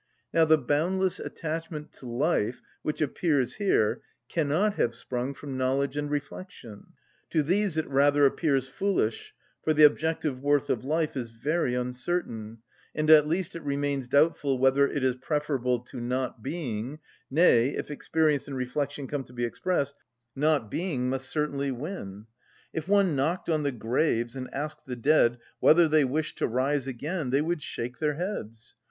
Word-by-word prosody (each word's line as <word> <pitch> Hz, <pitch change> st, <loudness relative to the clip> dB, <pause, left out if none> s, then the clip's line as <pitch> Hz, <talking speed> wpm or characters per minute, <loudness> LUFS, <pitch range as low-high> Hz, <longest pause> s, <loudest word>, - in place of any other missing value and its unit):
Now 165 Hz, -1 st, +5 dB
the 160 Hz, 0 st, +5 dB
boundless 170 Hz, +7 st, 0 dB
attachment 160 Hz, -1 st, -5 dB
to 130 Hz, -, -11 dB
life 125 Hz, -2 st, 0 dB, 0.2 s
which 150 Hz, -, -3 dB
appears 145 Hz, -4 st, +1 dB
here 150 Hz, -, +2 dB, 0.3 s
cannot 165 Hz, +7 st, +1 dB
have 120 Hz, -, 0 dB
sprung 125 Hz, +3 st, -4 dB
from 135 Hz, -2 st, -6 dB
knowledge 135 Hz, +2 st, 0 dB
and 145 Hz, 0 st, -2 dB
reflection; 145 Hz, -, -7 dB, 0.4 s
to 155 Hz, -, +2 dB
these 185 Hz, +2 st, +1 dB
it 160 Hz, -, 0 dB
rather 145 Hz, +1 st, +4 dB
appears 135 Hz, -2 st, +2 dB
foolish, 160 Hz, -, -1 dB, 0.3 s
for 155 Hz, -, +2 dB
the 155 Hz, -, +6 dB
objective 150 Hz, -2 st, +3 dB
worth 145 Hz, +1 st, +2 dB
of 125 Hz, -, -1 dB
life 155 Hz, +2 st, 0 dB
is 120 Hz, -3 st, -3 dB
very 125 Hz, +3 st, -1 dB
uncertain, 125 Hz, -3 st, -3 dB, 0.3 s
and 155 Hz, 0 st, +2 dB
at 150 Hz, -1 st, +8 dB
least 175 Hz, +3 st, -1 dB
it 170 Hz, -, -5 dB
remains 140 Hz, -2 st, -1 dB
doubtful 140 Hz, -1 st, +2 dB
whether 135 Hz, +2 st, +4 dB
it 140 Hz, -, -3 dB
is 130 Hz, -1 st, +1 dB
preferable 130 Hz, -3 st, 0 dB
to 125 Hz, 0 st, -9 dB
not 125 Hz, -1 st, -2 dB
being, 130 Hz, -3 st, -4 dB, 0.3 s
nay, 135 Hz, -5 st, +5 dB
if -, -, -4 dB
experience 150 Hz, -1 st, +1 dB
and 140 Hz, -2 st, -5 dB
reflection 140 Hz, +3 st, -2 dB
come 140 Hz, 0 st, -3 dB
to -, -, -16 dB
be 120 Hz, -1 st, -1 dB
expressed, 140 Hz, +2 st, -1 dB, 0.4 s
not 145 Hz, -6 st, +1 dB
being 140 Hz, -8 st, -1 dB
must 135 Hz, 0 st, -3 dB
certainly 140 Hz, -2 st, -1 dB
win. 120 Hz, -, -6 dB, 0.5 s
If 160 Hz, +1 st, -4 dB
one 200 Hz, -5 st, +3 dB
knocked 160 Hz, +7 st, -1 dB
on 155 Hz, -1 st, +1 dB
the 145 Hz, -1 st, 0 dB
graves, 120 Hz, 0 st, 0 dB
and 130 Hz, -1 st, -6 dB
asked 150 Hz, +1 st, -5 dB
the 125 Hz, -, -4 dB
dead 120 Hz, -1 st, +3 dB, 0.2 s
whether 165 Hz, +1 st, +6 dB
they 155 Hz, -2 st, +4 dB
wished 150 Hz, +4 st, -2 dB
to -, -, +2 dB
rise 135 Hz, +3 st, 0 dB
again, 145 Hz, +4 st, -3 dB
they 135 Hz, +3 st, +2 dB
would 170 Hz, -1 st, -1 dB
shake 125 Hz, -2 st, -5 dB
their 150 Hz, -2 st, 0 dB
heads. 115 Hz, -, -5 dB
145 Hz, 165 wpm, -27 LUFS, 125-155 Hz, 0.5 s, at